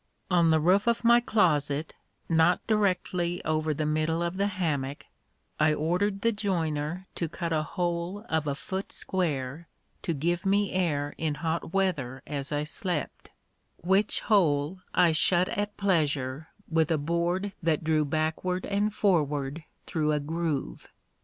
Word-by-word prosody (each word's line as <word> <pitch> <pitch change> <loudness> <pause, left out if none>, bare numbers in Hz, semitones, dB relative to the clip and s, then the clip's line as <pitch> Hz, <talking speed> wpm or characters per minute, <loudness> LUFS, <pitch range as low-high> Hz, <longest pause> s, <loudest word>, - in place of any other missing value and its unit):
On 170 -2 +4
the 160 0 +4
roof 185 +7 +3
of 235 0 +2
my 235 +1 +7
closet, 155 -10 +1 0.3
not 165 +2 +3
directly 180 -4 0
over 155 0 0
the 155 +1 -1
middle 155 +2 0
of 170 +2 -2
the 200 +1 +2
hammock, 150 -8 -2 0.5
I 155 0 +4
ordered 185 +6 0
the 230 - +3
joiner 175 -4 -2
to 170 - -3
cut 170 0 -3
a 155 - +2
hole 175 +4 -3
of 160 -2 0
a 140 - 0
foot 190 +6 -5
square, 155 -4 -2 0.3
to 170 - -2
give 170 +4 0
me 200 0 +2
air 150 -6 0
in 155 -2 -1
hot 165 +1 -2
weather 135 -10 0
as 140 -1 -4
I 145 0 0
slept; 155 +1 -4 0.5
which 190 +4 +1
hole 170 -5 +2
I 175 -2 +4
shut 175 +3 +3
at 205 +1 -3
pleasure, 155 -6 0 0.2
with 160 -1 +2
a 160 - +2
board 170 +6 -1
that 160 -1 +1
drew 155 -1 +2
backward 160 +5 -1
and 205 +1 0
forward 150 -7 0 0.2
through 155 -2 0
a 150 - +1
groove. 150 - -3
165 Hz, 150 wpm, -28 LUFS, 150-185 Hz, 0.5 s, my